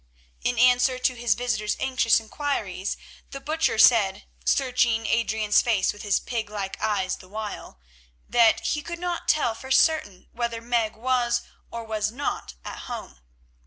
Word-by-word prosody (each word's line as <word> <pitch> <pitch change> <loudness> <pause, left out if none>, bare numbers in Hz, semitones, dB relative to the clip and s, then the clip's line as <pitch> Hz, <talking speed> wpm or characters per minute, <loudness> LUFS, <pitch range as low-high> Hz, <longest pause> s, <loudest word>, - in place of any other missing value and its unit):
In 245 -1 0
answer 250 +1 +4
to 255 0 +1
his 240 -2 +1
visitor's 215 -4 -1
anxious 255 -4 +3
inquiries 220 -6 -3 0.3
the 275 - -7
Butcher 305 -2 0
said, 215 -4 +5 0.2
searching 240 - +2
Adrian's 220 -2 +2
face 220 -6 +1
with 205 - -11
his 205 -2 +1
pig 225 -4 -4
like 200 -2 -5
eyes 200 -4 0
the 185 - -16
while, 210 - -7 0.5
that 235 -2 +4
he 295 - -1
could 340 +3 -6
not 350 0 -4
tell 295 -7 +2
for 260 +4 -10
certain 265 - +2
whether 235 -1 -3
Meg 230 -2 0
was 240 0 0 0.3
or 235 0 -6
was 215 -1 -2
not 240 - -4
at - - -6
home. 65 - -7
230 Hz, 155 wpm, -25 LUFS, 215-255 Hz, 0.5 s, said